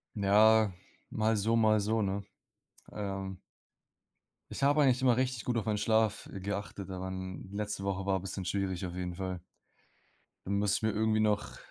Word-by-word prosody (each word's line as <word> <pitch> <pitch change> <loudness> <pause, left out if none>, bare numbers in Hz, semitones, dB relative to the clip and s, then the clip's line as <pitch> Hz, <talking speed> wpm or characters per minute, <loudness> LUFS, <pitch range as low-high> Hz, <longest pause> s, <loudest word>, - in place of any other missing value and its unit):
Ja, 105 +1 +5 0.4
mal 110 0 +1
so, 110 +3 +1
mal 110 -1 +4
so, 110 +2 +1
ne. 100 +1 -1 0.7
Ähm 95 -2 -4 1.1
Ich - - -6
habe 145 +2 +4
eigentlich 130 -2 +4
immer 125 -2 +4
richtig 130 -3 -1
gut 120 -1 -1
auf 110 - 0
meinen 105 -1 0
Schlaf, 110 0 +1
äh, 95 - -6
geachtet, 100 0 -5
aber 95 0 -4
'n 95 0 -6
letzte 105 -1 -3
Woche 95 -1 -2
war 95 -1 +1
bisschen 95 0 -5
schwierig 95 0 -2
auf 90 - -7
jeden 90 -1 -4
Fall. 95 -1 -4 1.0
Da - - -5
muss 100 0 +2
ich - - -5
mir 110 - +2
irgendwie 110 0 +1
noch 105 -1 0
100 Hz, 175 wpm, -31 LUFS, 95-110 Hz, 1.1 s, Ja